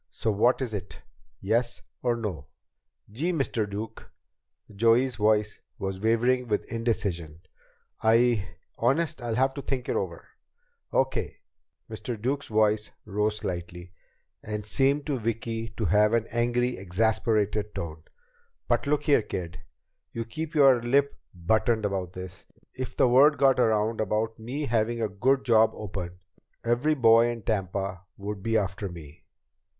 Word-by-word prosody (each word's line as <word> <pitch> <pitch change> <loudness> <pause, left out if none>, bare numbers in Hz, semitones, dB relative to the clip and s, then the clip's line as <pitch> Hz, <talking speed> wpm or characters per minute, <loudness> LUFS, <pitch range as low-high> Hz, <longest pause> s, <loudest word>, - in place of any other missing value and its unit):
So 110 - -1
what 120 +6 +2
is 120 -4 -4
it? 100 -2 -7 0.4
Yes 115 +4 0 0.2
or 120 -1 +1
no?" 90 -11 -5 0.6
"Gee, 155 +12 -1
Mr. 125 - -1
Duke!" 105 +2 -7 0.6
Joey's 115 +3 +3
voice 105 -1 +2 0.2
was 95 -1 -4
wavering 120 +3 +2
with 105 -2 -1
indecision. 95 -9 -2 0.6
"I 115 -3 +3 0.3
Honest, 160 +1 +1
I'll 120 -2 -2
have 130 +2 +2
to 140 - -5
think 130 -2 -3
it - - -1
over." - - -3 0.6
"Okay!" - - -1 0.5
Mr. 120 -5 -5
Duke's 135 +5 -2
voice 105 -1 +2 0.2
rose 105 +1 0
slightly, 90 -2 -6 0.5
and 105 -1 -5
seemed 140 +5 +1
to 140 -4 -1
Vicki 115 0 -3
to 110 - -1
have 105 +5 +4
an 115 -1 +1
angry, 120 +1 0
exasperated 105 +2 0
tone. 80 -2 -5 0.7
"But - - +1
look 150 0 +1
here, 145 -5 +4
kid. 90 -4 -6 0.5
You 115 0 -3
keep 160 +8 -6
your 135 -5 +6
lip 140 +4 +2 0.2
buttoned 110 +5 +1
about 95 -3 -2
this. 90 0 -9 0.3
If 130 0 -6
the - - +5
word 140 +5 +6
got 135 -2 +4
around 110 -1 +2
about 110 +2 -1
me 130 +7 -4
having 115 -1 0
a 110 - +1
good 130 +7 +1
job 110 -2 +5
open, 90 -4 -6 0.5
every 125 +7 +2
boy 115 -3 +6
in 115 -2 -5
Tampa 95 -3 -2 0.2
would 100 0 -5
be 115 +2 +1
after 100 -1 -2
me. 80 -3 -12
110 Hz, 145 wpm, -27 LUFS, 100-125 Hz, 0.7 s, your